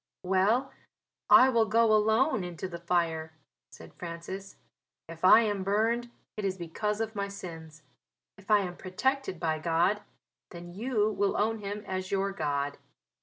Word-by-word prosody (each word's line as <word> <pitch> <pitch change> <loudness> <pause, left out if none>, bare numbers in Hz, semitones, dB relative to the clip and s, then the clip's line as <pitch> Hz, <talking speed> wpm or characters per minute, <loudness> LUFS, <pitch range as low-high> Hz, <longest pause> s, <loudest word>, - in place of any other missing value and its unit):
"Well, 195 +8 +2 0.6
I 260 - +8
will 230 -3 +2
go 225 +1 +4
alone 220 +2 +3
into 175 0 -5
the 170 -2 -8
fire," 165 -2 -1 0.4
said - - -14
Francis. 175 +3 -7 0.5
"If 165 +1 -11
I 215 +5 +8
am 205 -4 -1
burned 225 +5 0 0.3
it 210 - -4
is 190 -1 -1
because 210 +5 -3
of 220 0 -3
my 200 -2 -2
sins 160 -5 -9 0.5
if 195 +1 -19
I 210 -1 +5
am 180 -2 -5
protected 260 +2 -2
by 160 -2 -1
God 170 +6 +1 0.5
then 175 0 -10
you 215 0 0
will 200 -1 0
own 220 +2 0
Him 205 0 -5
as 185 0 -4
your 195 0 0
God." 145 -5 -2
195 Hz, 155 wpm, -29 LUFS, 170-215 Hz, 0.6 s, I